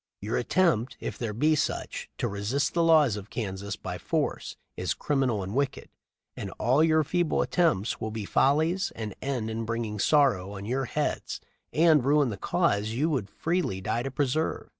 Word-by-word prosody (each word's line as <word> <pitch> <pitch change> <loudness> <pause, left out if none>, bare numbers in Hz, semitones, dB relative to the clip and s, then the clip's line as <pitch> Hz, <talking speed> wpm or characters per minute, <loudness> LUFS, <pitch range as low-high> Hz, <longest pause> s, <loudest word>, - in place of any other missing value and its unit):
Your 105 +3 -3
attempt, 130 -4 +1
if - - -5
there 115 -3 -2
be 150 +9 +2
such, 150 - -2
to - - -1
resist 105 +8 -1
the 170 - +2
laws 155 -8 +5
of 105 0 -8
Kansas 100 -2 -4
by - - -6
force - - -2 0.2
is - - -2
criminal 130 -8 0
and 95 +2 -5
wicked; 140 +1 -1 0.5
and - - -5
all 130 +6 +3
your 160 -1 +4
feeble 175 +2 +1
attempts 155 - +1
will 110 - -2
be 110 -1 -5
follies 160 - +2
and 110 -3 -5
end 125 -5 -2
in 115 +1 -3
bringing 115 -2 -3
sorrow 105 -9 +3
on 100 - -7
your 130 +4 -1
heads - - -2 0.3
and 155 -3 +5
ruin 140 -2 +3
the 100 - -5
cause 100 +1 +1
you 140 +9 0
would 120 -9 -1
freely 165 - -1
die 105 +5 -1
to 135 - -3
preserve!" 145 +3 -1
125 Hz, 180 wpm, -27 LUFS, 105-150 Hz, 0.5 s, laws